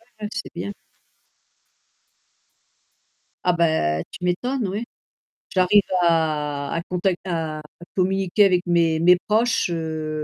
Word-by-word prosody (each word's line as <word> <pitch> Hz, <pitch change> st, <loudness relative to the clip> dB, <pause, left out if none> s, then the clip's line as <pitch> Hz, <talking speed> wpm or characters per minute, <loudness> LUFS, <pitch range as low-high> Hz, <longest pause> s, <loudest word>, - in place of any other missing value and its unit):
ouais, 230 Hz, -, -28 dB, 0.2 s
ouais, 210 Hz, -, -2 dB
c'est -, -, -5 dB
bien. 200 Hz, -, -4 dB, 2.7 s
Ah 180 Hz, -, +3 dB
bah, 155 Hz, -, +1 dB
tu -, -, -10 dB
m'étonnes, 240 Hz, +6 st, -1 dB
ouais. 205 Hz, +5 st, -3 dB, 0.7 s
J'arrive 185 Hz, +2 st, +4 dB, 0.2 s
à 150 Hz, -4 st, 0 dB
à 165 Hz, -, -1 dB
contact 180 Hz, 0 st, 0 dB
à 160 Hz, -4 st, -3 dB, 0.3 s
communiquer 190 Hz, +2 st, +2 dB
avec 180 Hz, -2 st, +2 dB
mes 170 Hz, -2 st, +2 dB
mes 180 Hz, +2 st, +6 dB
proches, 225 Hz, -1 st, +2 dB
heu 155 Hz, -2 st, -3 dB
175 Hz, 115 wpm, -23 LUFS, 160-190 Hz, 2.7 s, mes